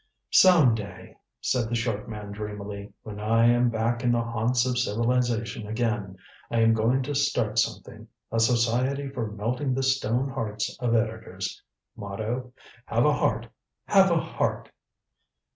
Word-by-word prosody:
"Some 170 -10 +6
day," 105 -2 -7 0.3
said 120 -3 0
the 120 - -1
short 115 -3 -2
man 105 -2 -7
dreamily, 105 -1 -6
"when 105 -1 -8
I 115 +2 +3
am 120 +1 +4
back 115 +2 -1
in 120 - +3
the 120 -1 +2
haunts 115 +2 0
of 125 -1 0
civilization 115 -1 0
again, 105 -4 -2 0.3
I 115 - +1
am 115 0 +5
going 115 +4 +2
to 145 +3 -3
start 135 -6 +1
something. 110 0 -3 0.2
A 115 - 0
Society 125 +4 +1
for 120 -5 -4
Melting 125 +6 -2
the 135 - -1
Stone 130 -1 +1
Hearts 110 -5 -3
of 120 -1 +1
Editors. 110 -4 -3 0.3
Motto: 110 +4 -4 0.4
'Have - - +2
a - - +4
heart - - 0 0.4
have - - +5
a - - +3
heart!' - - -2
115 Hz, 150 wpm, -26 LUFS, 110-125 Hz, 0.4 s, Some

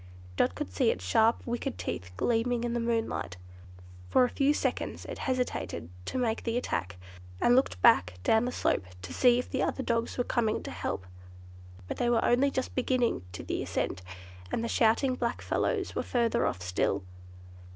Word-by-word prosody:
Dot 90 - +2
could 90 +1 -5
see 90 - +3
its 90 - -2
sharp, 220 - +3
wicked 240 - -3
teeth 90 0 -4
gleaming 240 - +1
in 240 -1 -1
the 240 - 0
moonlight. 225 - -1 0.7
For 255 - +5
a 250 - +2
few 275 +3 +2
seconds 295 - -2
it - - -7
hesitated 250 - -2 0.2
to - - -3
make 230 -3 0
the 230 0 -1
attack, 90 - -2 0.4
and 240 - +4
looked 260 - +2
back 90 0 +5
down 220 - +3
the 250 - -1
slope, 100 - 0 0.2
to - - -6
see 245 -2 +5
if 250 - -3
the - - 0
other 265 - -1
dogs 235 -1 -1
were 245 - +2
coming 225 -3 0
to - - -6
help; 90 +1 -3 0.8
but - - -4
they 240 - +1
were 235 -1 +3
only 255 +4 +4
just 260 -1 -3
beginning 250 - +1
the 90 - -4
ascent, - - -2 0.5
and 230 - -1
the - - -1
shouting 230 +4 +3
black 240 -1 -2
fellows - - -1
were - - -1
further 235 -2 +1
off 90 - -3
still. 90 +2 0
235 Hz, 185 wpm, -29 LUFS, -, 0.8 s, For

